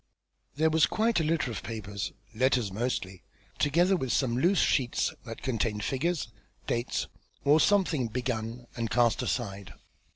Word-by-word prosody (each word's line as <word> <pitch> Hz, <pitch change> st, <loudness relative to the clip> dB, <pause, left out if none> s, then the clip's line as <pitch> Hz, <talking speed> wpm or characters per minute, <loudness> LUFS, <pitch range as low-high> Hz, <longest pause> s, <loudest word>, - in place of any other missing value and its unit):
There 160 Hz, +2 st, +3 dB
was 160 Hz, -1 st, +4 dB
quite 225 Hz, -2 st, +1 dB
a -, -, +1 dB
litter 155 Hz, -5 st, 0 dB
of 110 Hz, -, -5 dB
papers, 100 Hz, -3 st, -5 dB, 0.2 s
letters 125 Hz, -3 st, +2 dB
mostly, 95 Hz, -4 st, -3 dB, 0.4 s
together 175 Hz, +6 st, +3 dB
with 130 Hz, -8 st, -2 dB
some 125 Hz, -4 st, +1 dB
loose 175 Hz, +10 st, +3 dB
sheets 125 Hz, -7 st, +2 dB
that 115 Hz, -2 st, -8 dB
contained 115 Hz, -4 st, -1 dB
figures, 150 Hz, 0 st, -1 dB, 0.4 s
dates, 120 Hz, +1 st, -1 dB, 0.4 s
or 145 Hz, +3 st, +6 dB
something 170 Hz, -, +3 dB
begun 120 Hz, 0 st, -3 dB
and 115 Hz, -1 st, -2 dB
cast 120 Hz, 0 st, +3 dB
aside. 100 Hz, -5 st, -3 dB
125 Hz, 140 wpm, -29 LUFS, 115-155 Hz, 0.4 s, or